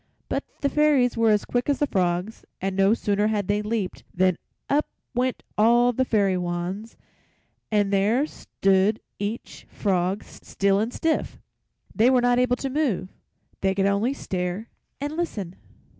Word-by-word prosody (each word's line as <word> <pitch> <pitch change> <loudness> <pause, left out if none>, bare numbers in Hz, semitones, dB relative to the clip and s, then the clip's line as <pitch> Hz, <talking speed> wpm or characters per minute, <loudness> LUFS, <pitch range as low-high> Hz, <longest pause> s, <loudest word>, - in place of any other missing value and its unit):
But - - -1 0.2
the 280 - +2
Fairies 290 -5 +3
were 230 -1 +3
as 210 -1 +3
quick 245 +3 -1
as 285 - +2
the 290 - +2
frogs, 180 -1 -1 0.2
and 190 0 -2
no 195 +3 +4
sooner 205 -2 +1
had 210 -3 -1
they 205 +1 +1
leaped 210 -3 -3
than 185 -1 +2 0.3
up 295 +2 +2 0.3
went 250 +1 -1 0.2
all 240 +3 +5
the 260 +3 +1
fairy 200 -5 +2
wands, 180 +5 -4 0.7
and 205 -2 +2
there 215 +8 +3
stood 195 -6 +1 0.2
each 205 +3 -5
frog 190 0 0
still 200 0 -1
and 225 +3 -1
stiff. 320 +4 -1 0.6
They 225 +3 +4
were 260 -1 +4
not 245 0 +3
able 250 0 +3
to 270 +2 -4
move; 255 - 0 0.5
they 190 0 +1
could 195 0 +2
only 200 +7 +1
stare 185 0 -3 0.3
and 290 +2 -3
listen. 205 - -3
210 Hz, 160 wpm, -25 LUFS, 195-245 Hz, 0.7 s, all